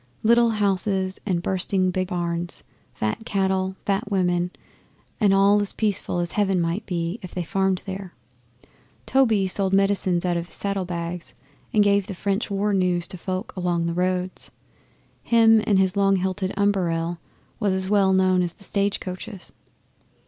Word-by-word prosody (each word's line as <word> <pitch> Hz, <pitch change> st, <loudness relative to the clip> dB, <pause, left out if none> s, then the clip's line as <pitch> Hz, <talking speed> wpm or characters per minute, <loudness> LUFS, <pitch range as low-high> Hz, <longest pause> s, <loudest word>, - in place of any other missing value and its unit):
Little 235 Hz, +1 st, +5 dB
houses 195 Hz, -2 st, 0 dB
and 175 Hz, -3 st, 0 dB
bursting 185 Hz, 0 st, 0 dB
big 185 Hz, 0 st, -1 dB
barns, 175 Hz, -1 st, -3 dB, 0.3 s
fat 110 Hz, -, -3 dB
cattle, 190 Hz, -2 st, 0 dB
fat 200 Hz, +1 st, -1 dB
women, 180 Hz, -3 st, +1 dB, 0.7 s
and 210 Hz, -4 st, +4 dB
all 200 Hz, +1 st, +5 dB
as 205 Hz, -, -2 dB
peaceful 205 Hz, -4 st, -1 dB
as 175 Hz, 0 st, -1 dB
Heaven 195 Hz, -3 st, +1 dB
might 170 Hz, +5 st, -2 dB
be 175 Hz, +3 st, -2 dB
if 185 Hz, -, -10 dB
they 180 Hz, -, -1 dB
farmed 190 Hz, +2 st, 0 dB
there. 190 Hz, -2 st, -7 dB, 0.9 s
Toby 225 Hz, -7 st, +3 dB
sold 190 Hz, 0 st, 0 dB
medicines 195 Hz, -3 st, +2 dB
out 175 Hz, -1 st, +1 dB
of 170 Hz, 0 st, -4 dB
his -, -, -9 dB
saddlebags, 180 Hz, -3 st, -4 dB, 0.4 s
and 210 Hz, -, +4 dB
gave 200 Hz, -1 st, +2 dB
the 195 Hz, -, -5 dB
French 200 Hz, +4 st, -1 dB
war 200 Hz, +1 st, 0 dB
news 180 Hz, -2 st, +1 dB
to 185 Hz, -, -6 dB
folk 185 Hz, +4 st, -4 dB
along 175 Hz, -2 st, 0 dB
the 170 Hz, -, -1 dB
roads. 180 Hz, +1 st, -1 dB, 0.7 s
Him 225 Hz, -1 st, +5 dB
and 200 Hz, -, +4 dB
his 190 Hz, 0 st, +2 dB
long 195 Hz, -1 st, +3 dB
hilted 190 Hz, +1 st, -1 dB
umberell 175 Hz, -4 st, 0 dB, 0.4 s
was 205 Hz, -3 st, +1 dB
as 190 Hz, 0 st, -1 dB
well 200 Hz, -1 st, +3 dB
known 185 Hz, -1 st, +3 dB
as 175 Hz, -1 st, -1 dB
the 200 Hz, -, -20 dB
stage 200 Hz, +1 st, 0 dB
coaches. 185 Hz, +1 st, -8 dB
190 Hz, 160 wpm, -24 LUFS, 180-200 Hz, 0.9 s, Little